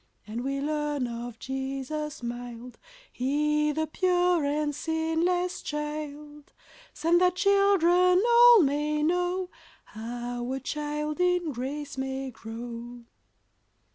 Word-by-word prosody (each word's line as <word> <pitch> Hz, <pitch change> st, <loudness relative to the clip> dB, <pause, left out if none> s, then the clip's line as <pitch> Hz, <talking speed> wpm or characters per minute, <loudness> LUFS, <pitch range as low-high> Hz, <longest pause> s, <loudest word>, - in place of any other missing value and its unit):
And 225 Hz, +3 st, -5 dB
we 275 Hz, +1 st, -2 dB
learn 295 Hz, -2 st, -1 dB
of 235 Hz, -1 st, -6 dB
Jesus 270 Hz, +3 st, -4 dB
mild, 240 Hz, 0 st, -7 dB, 0.3 s
He 300 Hz, +3 st, +1 dB
the 315 Hz, +2 st, -1 dB
pure 355 Hz, 0 st, +2 dB
and 295 Hz, +1 st, 0 dB
sinless 325 Hz, +4 st, -1 dB
child, 300 Hz, -1 st, -6 dB, 0.4 s
Sent 330 Hz, +3 st, +2 dB
that 360 Hz, 0 st, +3 dB
children 365 Hz, -2 st, +4 dB
all 475 Hz, -3 st, +8 dB
may 300 Hz, +1 st, 0 dB
know 360 Hz, +2 st, 0 dB, 0.3 s
How 240 Hz, +2 st, -5 dB
a 270 Hz, -, -2 dB
child 300 Hz, +3 st, -3 dB
in 360 Hz, -3 st, +2 dB
grace 275 Hz, +2 st, -5 dB
may 265 Hz, 0 st, -3 dB
grow. 235 Hz, +1 st, -8 dB
295 Hz, 110 wpm, -27 LUFS, 260-345 Hz, 0.4 s, all